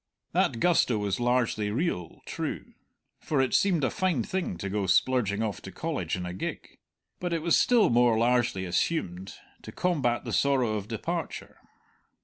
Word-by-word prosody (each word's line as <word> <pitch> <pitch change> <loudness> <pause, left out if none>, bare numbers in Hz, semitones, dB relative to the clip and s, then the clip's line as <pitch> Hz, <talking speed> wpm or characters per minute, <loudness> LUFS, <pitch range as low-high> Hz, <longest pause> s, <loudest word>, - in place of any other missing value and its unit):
That 115 - +1
gusto 160 -9 +3
was 100 -1 -1
largely 120 -4 +1
real, 105 - -2
true, - - -5 0.5
for 150 - -1
it 130 -1 +1
seemed 180 -7 +3
a 130 - +1
fine 185 - 0
thing 185 - -3
to 100 - -4
go 100 0 -1
splurging 110 0 +2
off 105 -5 -3
to - - -9
College - - -3
in 90 -1 -5
a 90 - -5
gig; 95 - -6 0.4
but 175 -1 -2
it 165 -2 -1
was 170 -1 +4
still 240 - +4
more 120 -1 +4
largely 120 -4 +1
assumed, 90 - -2 0.3
to - - -9
combat 140 -10 0
the - - -4
sorrow 130 -5 +2
of 105 -1 -3
departure. 110 -2 -5
120 Hz, 165 wpm, -28 LUFS, 100-155 Hz, 0.5 s, was